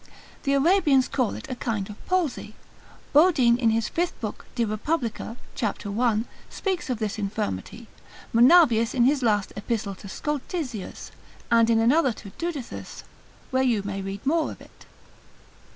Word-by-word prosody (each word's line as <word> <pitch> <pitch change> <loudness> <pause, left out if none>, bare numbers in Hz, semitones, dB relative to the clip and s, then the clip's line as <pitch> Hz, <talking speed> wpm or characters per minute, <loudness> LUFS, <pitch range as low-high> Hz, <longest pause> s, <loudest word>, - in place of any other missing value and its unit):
The 275 - 0
Arabians 290 -3 +4
call 255 -5 0
it - - -8
a 260 - -4
kind 220 -5 -3
of 210 - -11
palsy. 325 -12 -1 0.6
Bodine 285 -7 +5
in 230 -3 +3
his 225 -1 +1
5th 345 +1 -1
book 215 -3 -6
de 235 -2 +1
Repub. 225 +3 -1 0.4
cap. 220 -3 -3
1, 220 +2 +1 0.2
speaks 375 -7 -3
of 250 - 0
this 215 -1 -3
infirmity; 205 - -4 0.5
Monavius 235 -2 +5
in 245 - +4
his 275 +2 +3
last 210 -5 +1
epistle 205 -1 -2
to 195 +1 -11
Scoltizius, 290 - -4 0.4
and 230 0 +5
in 230 - +4
another 255 +4 +3
to 205 -2 -11
Dudithus, 325 -8 -5 0.5
where 260 0 +2
you 235 -6 +2
may 200 -1 -4
read 195 +3 -6
more 315 +3 +2
of - - -11
it. - - -17
235 Hz, 150 wpm, -25 LUFS, 215-285 Hz, 0.6 s, Bodine